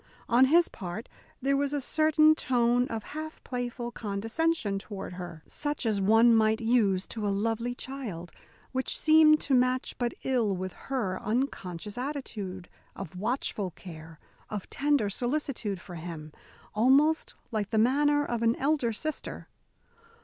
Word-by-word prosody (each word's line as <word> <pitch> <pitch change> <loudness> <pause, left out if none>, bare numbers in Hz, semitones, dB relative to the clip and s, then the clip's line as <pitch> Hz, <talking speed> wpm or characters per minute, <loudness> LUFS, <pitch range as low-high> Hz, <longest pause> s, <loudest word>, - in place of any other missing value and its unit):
On 245 +2 +5
his 335 +5 +5
part 190 +3 -7 0.4
there 275 +1 +2
was 280 0 0
a 290 - 0
certain 310 +2 +4
tone 245 -4 +2
of 225 -2 -4
half 310 +1 -6
playful 245 -1 -4
condescension 225 +2 -1
toward 195 -3 -7
her 175 -3 -8
such 295 -3 -3
as 210 -3 +1
one 225 +4 +6
might 220 0 +3
use 225 -5 +2
to 215 -2 -4
a - - +1
lovely 225 +4 -1
child, 225 -12 -6 0.4
which 260 0 -1
seemed 310 -1 +6
to 280 - -1
match 255 0 +2
but 240 -1 -1
ill 235 -7 +1
with 185 0 -4
her 225 -9 -3
unconscious 210 -4 -3
attitude 215 -10 -5 0.3
of 160 - -8
watchful 210 -1 -1
care, 160 -2 -11 0.3
of 210 -3 -5
tender 285 -6 +2
solicitude 240 -3 -2
for 180 - -11
him 160 -2 -7 0.4
almost 300 - +3 0.2
like 210 -3 -2
the 220 - 0
manner 290 +5 +3
of 240 -3 -2
an 230 0 +3
elder 275 -4 +1
sister. 310 +8 -4
235 Hz, 145 wpm, -28 LUFS, 200-275 Hz, 0.4 s, one